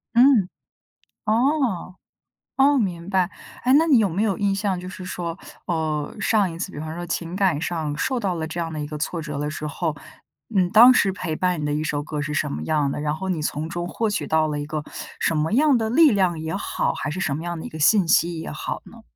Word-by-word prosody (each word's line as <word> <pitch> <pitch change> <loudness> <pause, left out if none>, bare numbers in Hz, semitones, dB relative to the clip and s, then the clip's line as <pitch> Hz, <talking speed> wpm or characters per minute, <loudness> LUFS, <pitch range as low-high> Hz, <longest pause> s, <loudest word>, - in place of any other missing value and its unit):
嗯， 240 -7 +5 0.8
哦， 230 - +1 0.6
哦， 275 +1 +5
明 180 -5 -2
白。 190 -1 +2 0.3
哎， 255 - +4
那 320 +3 +5
你 275 -7 +5
有 205 -3 +3
没 185 +6 -1
有 205 -4 0
印 200 -1 +1
象 195 -2 -1
就 180 +1 -7
是 185 0 -8
说， 175 -1 -4 0.3
哦， 155 -4 -2
上 205 -3 +2
一 165 - -8
次 190 +1 -4
比 - - -8
方 155 +1 -5
说 175 0 -5
情 170 +1 -3
感 185 -7 +2
上 155 -4 -2
受 260 -1 0
到 190 -4 -1
了 160 -1 -3
这 170 +2 -4
样 165 -1 -3
的 155 - -4
一 145 - -3
个 150 0 -6
挫 165 +2 -2
折 150 -2 -5
的 150 +1 -2
时 155 0 -5
候， 155 0 -2 0.6
嗯， 180 -2 +3
当 240 +4 +9
时 195 -5 +3
陪 180 -4 -4
伴 180 -3 0
你 150 - -2
的 145 - -1
一 155 - -1
首 145 -1 -1
歌 150 0 -4
是 150 +1 -3
什 - - 0
么 75 +1 -4
样 145 -3 +1
的？ 145 - -3
然 150 0 -1
后 190 +4 -5
你 170 -5 -1
从 155 +1 -2
中 175 +1 -4
获 225 -1 -1
取 - - -2
到 160 0 +2
了 150 -1 -2
一 145 - -5
个 155 -1 -3 0.4
什 165 - +1
么 155 +5 0
样 285 +1 +4
的 220 -1 -1
力 305 +3 +6
量 185 -5 +1
也 160 +3 -4
好， - - -1
还 150 - -3
是 185 +5 -4
什 145 -6 0
么 160 - -5
样 175 -1 -4
的 - - -7
一 - - -5
个 155 - -9
信 180 +4 +4
息 170 0 +3
也 - - -6
好 - - -4
呢？ 230 -1 -15
175 Hz, 270 characters per minute, -23 LUFS, 155-200 Hz, 0.8 s, 当